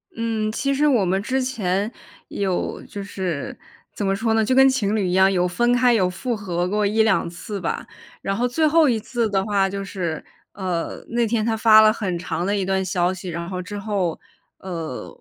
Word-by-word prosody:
嗯， 225 -2 -1
其 275 +5 -1
实 295 +2 +2
我 240 -8 +3
们 190 +2 +1
之 260 +4 -1
前 210 -4 -1 0.4
有 190 -3 -2
就 200 -1 -7
是 185 -7 -4 0.4
怎 205 - -3
么 195 0 +1
说 220 +2 0
呢， 220 -1 +3
就 255 - +1
跟 265 0 +7
情 220 -5 0
侣 195 -4 0
一 180 - -1
样 190 +1 +5
有 180 -1 +2
分 240 +7 +1
开 245 -1 +4
有 185 -5 +2
复 225 +6 -3
合 180 -4 -2
过 210 +2 0
1-2 220 -4 +2
次 195 +4 -6
吧。 170 - -3 0.4
然 195 0 -2
后 245 +3 +1
最 310 +5 +2
后 320 0 +5
一 225 -2 +1
次 230 0 -2
的 195 -1 +1
话 195 -2 +1
就 200 0 -4
是， 175 -5 -4 0.3
呃， 180 -4 -3
那 235 -1 +1
天 220 -1 0
她 225 -1 +1
发 220 -1 +7
了 215 0 +6
很 190 -6 -2
长 175 0 -3
的 205 +1 0
一 195 -2 -1
段 190 0 0
消 180 0 0
息， 185 0 -7
然 170 0 -4
后 185 -1 -4
之 205 +3 -7
后， 195 -5 -1 0.4
呃， 165 -8 -5
200 Hz, 225 characters per minute, -22 LUFS, 185-225 Hz, 0.4 s, 跟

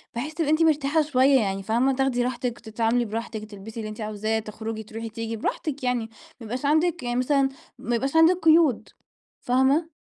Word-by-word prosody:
بحيث 280 +7 -4
تبقي 310 -2 -1
أنتِ 310 +1 +2
مرتاحة 310 -1 +2
شوية 275 -2 +4
يعني، 195 -3 -2
فاهمة 240 +6 +2
تاخدي 260 -2 +1
راحتِك، 245 -1 -3
تتعاملي 230 +2 0
براحتِك، 220 0 -5
وتلبسي 215 +2 -9
اللي 215 -1 -4
أنتِ 215 +1 -8
عاوزاه، 215 +1 -1
تخرجي 220 +1 -6
تروحي 225 +1 -7
تيجي 225 0 -5
براحتك 280 +5 -3
يعني، 245 -3 -1 0.3
ما - - -8
يبقاش 250 +5 -4
عندك 320 +3 +2
يعني 240 0 -2
مثلًا 270 +1 +2 0.3
ما 240 -1 -1
يبقاش 270 +5 -2
عندك 325 +3 +6
قيود، 320 -6 +4 0.5
فاهمة؟ 270 +6 +2
245 Hz, 180 wpm, -25 LUFS, 225-285 Hz, 0.5 s, عندك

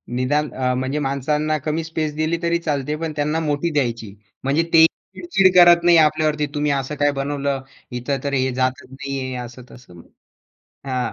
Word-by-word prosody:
निदान 145 +4 0
अ, 130 -1 0
म्हणजे 130 +3 -2
माणसांना 150 +3 -1
कमी 155 +3 -3
स्पेस 155 -2 -3
दिली 155 +2 0
तरी 170 0 +2
चालते, 150 -2 -2
पण 165 0 -4
त्यांना 150 +2 0
मोठी 150 +1 -1
द्यायची. 115 -7 -2 0.3
म्हणजे 145 +5 +1
ते 160 0 +8 0.3
चिड-चिड 185 +1 +2
करत 175 -1 +7
नाही 175 -1 +6
आपल्यावरती, 155 -1 +2
"तुम्ही 150 0 0
असं 140 +2 -2
काय 145 0 +2
बनवलं? 140 -1 -2 0.3
इथं 125 +3 -2
तर 140 - -2
हे 130 -1 +1
जातच 130 +2 -1
नाहीये," 135 -2 -5
असं-तसं. 120 -7 -14 0.9
हां. 125 -3 -2
145 Hz, 160 wpm, -21 LUFS, 130-155 Hz, 0.9 s, ते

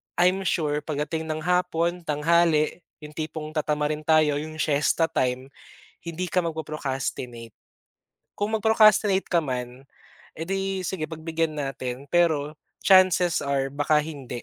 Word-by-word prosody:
I'm 185 +2 +2
sure 150 -3 0
pagdating 155 +1 -3
ng 155 0 -3
hapon, 180 0 0
tanghali, 155 +1 +2 0.2
yung 150 - -9
tipong 155 -1 -5
tatamarin 150 0 0
tayo, 155 -2 +4
yung 155 +1 -7
siesta 155 +2 +2
time, 130 -1 -1 0.5
hindi 170 +2 -4
ka 180 +1 +1
magpo-procrastinate. 135 -7 -4 0.9
Kung 205 +2 -1
mag-procrastinate 215 -3 +4
ka 170 - +3
man, 125 -2 -5 0.6
eh, 160 - -3
'di, 195 0 -2
sige 160 -5 -3
pagbigyan 160 -1 -2
natin. 135 -1 -4
Pero, 155 -4 +2 0.3
chances 185 -3 +4
are, 140 -1 0
baka 145 +1 +2
hindi, 135 -6 -7
155 Hz, 125 wpm, -25 LUFS, 145-175 Hz, 0.9 s, tayo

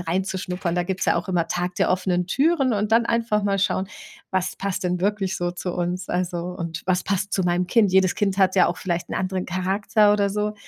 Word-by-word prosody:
reinzuschnuppern. 180 0 -2
Da 175 - +1
gibt's 185 +1 -2
ja - - +3
auch 200 - -3
immer 170 -3 +1
Tag 180 +1 -3
der - - +2
offenen 180 -1 0
Türen 275 - +2
und 210 0 -1
dann 230 +1 +4
einfach 230 -3 0
mal 195 -1 +1
schauen: 195 -1 0 0.5
„Was 185 -1 -1
passt 195 -1 -3
denn 180 0 -1
wirklich 195 -1 0
so 175 0 -2
zu 180 0 -4
uns?“ 180 +1 -3
Also, 180 -1 -1
und 170 -2 -5
„Was 185 -1 +1
passt 200 0 -1
zu 190 - +1
meinem 175 0 0
Kind?“ 210 -5 +3
Jedes 190 -1 +3
Kind 195 -1 0
hat 190 0 +3
ja 185 - +6
auch 180 - -2
vielleicht 175 -2 -3
'n - - -4
anderen 185 0 -2
Charakter 200 +3 +2
oder 200 -1 +1
so. 210 +1 -2
185 Hz, 225 wpm, -23 LUFS, 180-200 Hz, 0.5 s, ja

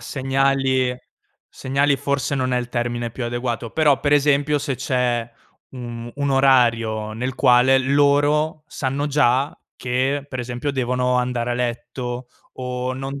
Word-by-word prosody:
segnali 135 -1 0 0.5
segnali 140 +1 0
forse 140 0 -1
non 130 -1 -1
è 125 - +2
il 120 0 -4
termine 120 -1 -2
più 120 +1 -5
adeguato, 120 -1 -3
però 150 -4 +3
per 145 0 +1
esempio 145 0 +3
se 140 -2 -2
c'è 125 -3 -1 0.4
u 130 - -12
mhmm, 120 -1 -7
un 140 -1 -1
orario 115 -5 +2
nel 125 +3 -3
quale 130 +1 +5
loro 145 +3 +2
sanno 140 +2 -2
già 140 -1 +1 0.2
che, 130 +3 -1
per 130 -2 -4
esempio, 125 +4 -3
devono 125 -1 0
andare 125 -1 -1
a 120 - 0
letto 120 0 -4 0.3
o 125 0 -3
non 135 +1 -5
130 Hz, 145 wpm, -21 LUFS, 120-140 Hz, 0.5 s, quale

